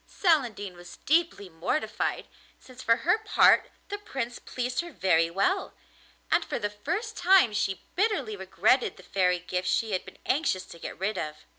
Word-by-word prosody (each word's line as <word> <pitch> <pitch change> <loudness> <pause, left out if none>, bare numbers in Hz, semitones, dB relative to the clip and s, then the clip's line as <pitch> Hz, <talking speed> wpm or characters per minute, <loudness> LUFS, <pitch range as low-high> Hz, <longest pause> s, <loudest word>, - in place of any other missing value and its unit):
Celandine 240 - +1
was 175 0 -12
deeply 320 - +1
mortified, 175 - -2 0.3
since 255 0 -13
for 230 - +4
her 355 +6 +4
part 435 0 +4 0.2
the 410 0 -4
Prince 265 - -5
pleased 250 +1 -3
her 345 0 -9
very 165 - +2
well, 280 - 0 0.6
and - - +4
for - - -3
the 205 0 -2
first 415 - -4
time 360 - +5
she 195 -2 -1
bitterly 425 +2 0
regretted - - +1
the - - -14
fairy 180 -2 +1
gifts 180 +1 -3
she 225 +2 +1
had 185 - -1
been - - -13
anxious 255 - 0
to 170 - -13
get - - -7
rid 195 +2 -2
of. 150 0 -6
230 Hz, 170 wpm, -28 LUFS, -, 0.6 s, time